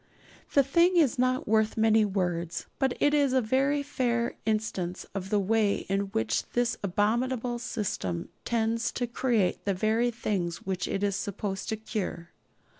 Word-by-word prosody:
The 280 - +7
thing 340 +7 +3
is 280 -7 +3
not 255 0 +1
worth 220 +1 +2
many 220 -1 +4
words, 175 -4 -2
but 265 -2 +1
it 290 - +3
is 285 -3 +3
a 260 - +4
very 275 +5 +1
fair 240 -4 0
instance 205 -5 -1
of 190 -1 -4
the 210 - +2
way 205 +1 +1
in 195 +1 0
which 110 - -1
this 240 -2 +1
abominable 235 +5 0
system 200 - -3
tends 230 0 0
to 245 - -1
create 235 -4 0
the 200 -1 0
very 220 +5 +2
things 195 -7 -2
which 185 -2 -2
it 195 - -2
is 200 -1 +1
supposed 195 -1 -4
to 220 - 0
cure. 210 -6 -5
220 Hz, 160 wpm, -28 LUFS, 195-245 Hz, -, The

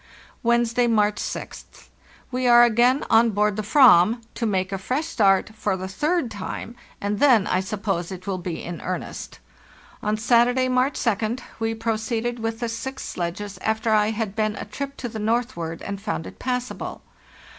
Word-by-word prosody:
"Wednesday, 235 0 +2
March 210 -2 +2
6th. - - -7 0.4
We 255 0 0
are 240 0 +8
again 240 +3 +4
on 230 +1 +6
board 210 -1 +1
the 215 - -2
/ram 230 - +5
to 230 - -2
make 190 -2 0
a 195 - -2
fresh 255 +10 -1
start, 205 -10 +2
for 205 -3 -1
the 185 0 -5
third 300 - -1
time, 215 +3 -6 0.2
and 205 0 -2
then, 245 -8 +5
I 185 - +1
suppose, 190 -2 -2
it 185 -1 -8
will 195 -2 -2
be 175 -2 -5
in 175 -1 -6
earnest. 185 0 -5 0.6
On 210 +1 0
Saturday, 245 +3 +3
March 255 +2 +2
2d, 230 +2 -1 0.2
we 225 0 -1
proceeded 225 +1 -2
with 225 0 -3
the 235 - 0
six 265 +4 -5
sledges 180 +3 -5
after 220 +1 0
I 210 0 +4
had 220 -2 -3
been 215 -1 0
a - - -6
trip 275 +7 -6
to 250 - -4
the 220 -1 -6
northward 215 -7 -2
and 200 0 -5
found 205 -6 -3
it - - -11
passable. 250 -1 -4
220 Hz, 175 wpm, -23 LUFS, 200-240 Hz, 0.6 s, are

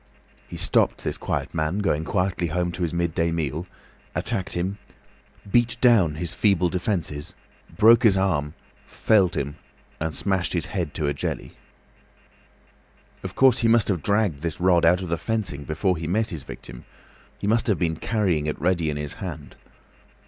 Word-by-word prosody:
He - - -8
stopped - - +2
this - - -2
quiet - - -3
man, 80 +4 -1
going 80 -7 0
quietly 90 -2 0
home 90 +2 -1
to 90 - -6
his 85 -3 0
midday 85 -1 0
meal, 80 +1 -2 0.5
attacked 95 -1 -2
him, 95 +4 -2 0.7
beat 120 +1 +3
down 105 -11 +4
his 85 +2 -4
feeble 95 -4 +2
defences, 85 -5 -3 0.4
broke 115 +2 +7
his 105 -5 +5
arm, 80 -6 0 0.3
felled 100 -5 +2
him, 70 +2 -3 0.4
and 80 0 -3
smashed 95 -3 0
his 85 - 0
head 85 -7 -4
to 75 - -1
a 70 - +1
jelly. 70 - -4 1.7
Of - - -7
course, 130 -2 +5
he 115 - +2
must 115 -2 +4
have 90 -6 0
dragged 100 -8 +1
this 85 -2 -3
rod 90 -2 +4
out 90 +3 +4
of 90 - -6
the 85 - 0
fencing 100 -11 -3
before 90 +5 0
he 80 -1 -5
met 110 +5 0
his 80 - -5
victim—he - - -12
must 115 +3 +2
have 105 - +2
been 80 -2 0
carrying 90 -6 0
it 75 - -3
ready 85 -2 +1
in 75 - -2
his 75 -1 -4
hand. - - -7
90 Hz, 170 wpm, -24 LUFS, 80-100 Hz, 1.7 s, broke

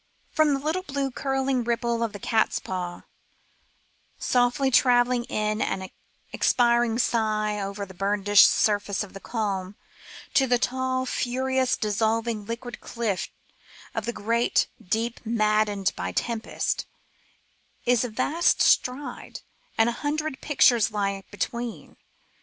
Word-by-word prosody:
From 310 -3 +3
the - - -3
little 315 +6 -1
blue 275 -5 -3
curliog 270 -2 -1
ripple 235 0 0
of 230 -2 0
the 205 - -7
catspaw, 185 -4 -1 1.2
softly 250 +2 +1
travelling 245 -1 +4
in 215 -1 -1
an 190 -1 -2 0.4
expiring 235 -1 +3
sigh 215 -3 0
over 200 0 -4
the 190 - -13
burnished 200 +1 +5
surface 205 -1 +1
of 205 - -11
the 195 - -8
calm, 200 -4 -3 0.6
to 270 - +4
the 245 0 +3
tall 260 +1 -1
furious 260 +1 0
dissolving 220 0 -1
liquid 240 +1 -6
cliffs 225 -6 -3 0.6
of 225 - -3
the - - +1
great 230 +3 +1 0.2
deep 225 +4 -2
maddened 215 -3 +1
by - - -3
tempest, 230 -2 -2 1.0
is 245 -1 +3
a 245 - -2
vast 315 +10 +1
stride, 255 +3 +1 0.4
and 225 - +4
a - - +2
hundred 300 -1 -2
pictures 245 -6 +4
lie 200 -2 -2
between. 235 +3 -5
235 Hz, 125 wpm, -25 LUFS, 210-255 Hz, 1.2 s, burnished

